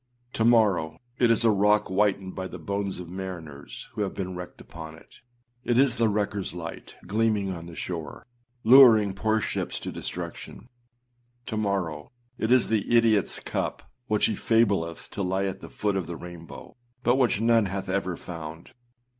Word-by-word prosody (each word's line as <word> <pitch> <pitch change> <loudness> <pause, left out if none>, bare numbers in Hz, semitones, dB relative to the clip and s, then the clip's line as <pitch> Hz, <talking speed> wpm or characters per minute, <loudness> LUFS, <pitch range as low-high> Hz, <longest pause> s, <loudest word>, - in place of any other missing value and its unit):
To 110 - 0
morrow 105 -9 +4
â - - -22 0.3
it - - +4
is 115 0 +3
a 115 - +6
rock 105 +1 +3
whitened 95 -1 +1
by 95 - -4
the - - -8
bones 100 -1 -3
of 90 - -7
mariners 85 -6 -8
who - - -4
have 100 - -2
been 95 -1 -4
wrecked 90 0 -8
upon 80 -1 -10
it; 80 - -18 0.4
it 120 - +1
is 135 -2 +4
the 115 0 +3
wreckerâs 100 -3 -2
light 85 -1 -8
gleaming 105 -2 +1
on 85 -2 -7
the 85 - -10
shore, 80 -4 -6 0.4
luring 110 -5 +8
poor 110 +3 +1
ships - - -3
to - - -5
destruction. 115 - -7 0.8
To 115 - -4
morrow 95 -8 -1 0.3
â - - 0
it 110 - 0
is 125 -1 +4
the 110 -3 +2
idiotâs 115 -5 +2
cup - - -3 0.2
which 105 -1 +2
he 110 - +1
fableth 100 -7 +1
to 105 - -4
lie 95 +1 0
at 95 0 -3
the - - -9
foot 105 -1 -1
of 95 -4 -2
the 85 - -5
rainbow, 85 -2 -10 0.3
but 120 +2 +3
which 125 -6 +2
none 115 -2 +3
hath 95 0 -4
ever 95 -2 -1
found. 80 -1 -8
100 Hz, 180 wpm, -26 LUFS, 90-110 Hz, 0.8 s, luring